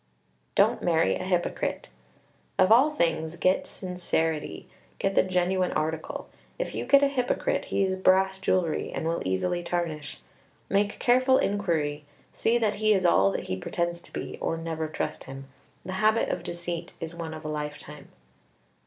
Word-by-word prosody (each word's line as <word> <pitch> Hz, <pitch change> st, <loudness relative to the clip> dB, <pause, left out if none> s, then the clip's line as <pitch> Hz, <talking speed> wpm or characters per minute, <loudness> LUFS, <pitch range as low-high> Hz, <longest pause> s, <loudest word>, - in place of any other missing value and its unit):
Don't -, -, +3 dB
marry 165 Hz, -2 st, +2 dB
a -, -, -4 dB
hypocrite. 180 Hz, -2 st, -1 dB, 0.7 s
Of 190 Hz, +1 st, +4 dB
all 255 Hz, +7 st, +7 dB
things 165 Hz, -, 0 dB
get 185 Hz, +2 st, +1 dB
sincerity. 170 Hz, -4 st, -2 dB, 0.3 s
Get 195 Hz, -, 0 dB
the -, -, +5 dB
genuine 185 Hz, 0 st, +1 dB
article. 160 Hz, +1 st, -3 dB, 0.3 s
If -, -, -3 dB
you -, -, -3 dB
get 280 Hz, 0 st, +6 dB
a -, -, +6 dB
hypocrite, 255 Hz, -3 st, 0 dB
he -, -, 0 dB
is 190 Hz, -1 st, 0 dB
brass 190 Hz, +1 st, +3 dB
jewelry, 185 Hz, -4 st, 0 dB
and 160 Hz, -, -3 dB
will 165 Hz, +1 st, -1 dB
easily 175 Hz, -, 0 dB
tarnish. 170 Hz, -4 st, -3 dB, 0.5 s
Make 205 Hz, +1 st, +1 dB
careful 255 Hz, +2 st, +4 dB
inquiry, 165 Hz, -, 0 dB, 0.3 s
see 235 Hz, +1 st, +2 dB
that 215 Hz, -3 st, 0 dB
he 215 Hz, 0 st, +5 dB
is 190 Hz, -2 st, +1 dB
all 100 Hz, -, +5 dB
that -, -, -3 dB
he 95 Hz, -, -3 dB
pretends 170 Hz, -, -2 dB
to -, -, -14 dB
be, -, -, -6 dB
or 165 Hz, -, -1 dB
never 160 Hz, -1 st, -3 dB
trust 155 Hz, -, -4 dB
him. 135 Hz, 0 st, -8 dB, 0.4 s
The 185 Hz, -, -4 dB
habit 220 Hz, +1 st, +3 dB
of -, -, -2 dB
deceit 170 Hz, -1 st, -5 dB
is 165 Hz, 0 st, -5 dB
one 165 Hz, -2 st, -6 dB
of 155 Hz, 0 st, -10 dB
a -, -, -2 dB
lifetime. 150 Hz, -1 st, -6 dB
175 Hz, 165 wpm, -27 LUFS, 160-195 Hz, 0.7 s, all